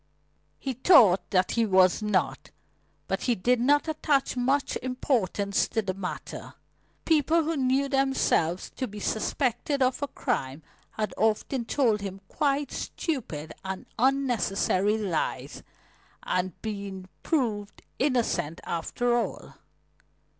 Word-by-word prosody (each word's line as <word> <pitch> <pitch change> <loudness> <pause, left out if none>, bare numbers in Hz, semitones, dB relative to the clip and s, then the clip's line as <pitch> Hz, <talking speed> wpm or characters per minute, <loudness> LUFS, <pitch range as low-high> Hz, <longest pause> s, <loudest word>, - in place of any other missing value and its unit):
He 265 - -3
thought 240 - +5
that 185 -2 +2
he 230 - +2
was 185 -2 +4
not. 210 -3 -1 0.6
But - - -1
he 245 - +1
did 240 +6 +2
not 290 +5 +3
attach 295 -4 +1
much 265 +3 +1
importance 230 -6 0
to 225 - -1
the 190 -2 -2
matter. 185 -1 -6 0.5
People 320 +1 +3
who 325 +1 -1
knew 270 0 +1
themselves 270 - +1
to 260 - -2
be 210 -1 -9
suspected 255 +5 0
of 255 +2 0
a 285 - 0
crime 150 - -3 0.3
had 215 -1 -3
often 225 +3 +1
told 230 -6 +1
him 195 -1 -6
quite 285 -1 0
stupid 190 - -4
and 190 0 -5
unnecessary 225 -6 +2
lies 195 -7 -2 0.6
and 180 -1 -2
been 200 -3 -5
proved 215 -10 -1 0.2
innocent 245 - 0
after 240 +8 -1
all. 240 - -3
230 Hz, 120 wpm, -27 LUFS, 195-270 Hz, 0.6 s, thought